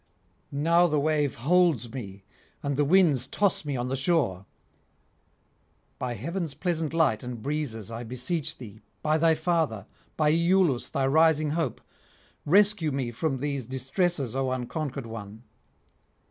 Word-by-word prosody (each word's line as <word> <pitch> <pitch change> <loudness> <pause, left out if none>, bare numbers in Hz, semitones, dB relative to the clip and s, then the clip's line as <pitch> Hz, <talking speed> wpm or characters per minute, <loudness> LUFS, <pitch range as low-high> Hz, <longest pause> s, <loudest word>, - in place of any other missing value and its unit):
Now 170 +5 +3
the 150 -2 +1
wave 150 -2 +1
holds 150 -4 +2
me, 100 -6 -7 0.4
and 140 -1 -1
the 145 - +2
winds 150 -5 +3
toss 200 -6 0
me 145 -3 -3
on 120 +1 -2
the 130 - -1
shore. 130 - 0 1.5
By 125 -1 -3
heaven's 165 - -4
pleasant 165 -4 -1
light 160 -10 +2
and 125 -2 -6
breezes 115 -5 -3
I 115 +1 -5
beseech 125 +7 -3
thee, 110 -3 -11 0.2
by 155 +1 +2
thy 165 0 +4
father, 160 - 0 0.3
by 150 -1 +3
Iülus 170 -4 +2
thy 135 - 0
rising 155 +1 +3
hope, 165 +1 -2 0.7
rescue 195 -2 +4
me 130 -3 -2
from 135 +4 -1
these 140 -5 -2
distresses, 135 - -1
O 135 -1 0
unconquered 135 +1 -4
one! 110 -1 -9
145 Hz, 140 wpm, -27 LUFS, 125-165 Hz, 1.5 s, thy